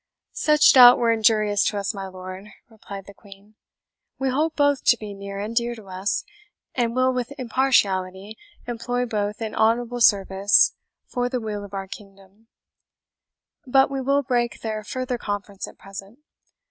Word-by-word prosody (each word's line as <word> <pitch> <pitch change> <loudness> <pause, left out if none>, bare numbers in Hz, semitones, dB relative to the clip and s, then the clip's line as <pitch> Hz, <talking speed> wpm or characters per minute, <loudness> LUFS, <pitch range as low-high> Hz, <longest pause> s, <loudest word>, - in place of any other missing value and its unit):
"Such 300 -1 +4
doubt 245 -2 +9
were 235 -1 +2
injurious 215 -2 +2
to 210 - -1
us, 200 +3 -2
my 195 -1 -6
lord," 185 +1 -9 0.2
replied 200 -3 -10
the 200 - -13
Queen. 200 +1 -17 0.6
"We 265 0 -1
hold 305 +5 0
both 285 -2 +2
to 240 - +5
be 210 -2 -8
near 200 0 -8
and 210 +3 -5
dear 240 0 0
to 220 -3 -13
us, 190 +3 -2 0.5
and 235 -2 -1
will 255 0 +2
with 250 0 -3
impartiality 210 -6 0 0.3
employ 245 +1 -2
both 210 -1 -3
in 220 - -5
honourable 235 +2 +1
service 195 -1 +4 0.3
for 245 -1 -2
the 250 0 -2
weal 210 -2 -5
of 200 0 -9
our 195 0 -4
kingdom. 195 +2 -14 1.2
But 270 +2 +3
we 270 -1 -2
will 280 +2 +1
break 240 -2 -1
their 215 -1 -4
further 255 +2 -4
conference 205 -2 -5
at - - -14
present. 195 +3 -11
220 Hz, 160 wpm, -23 LUFS, 200-245 Hz, 1.2 s, doubt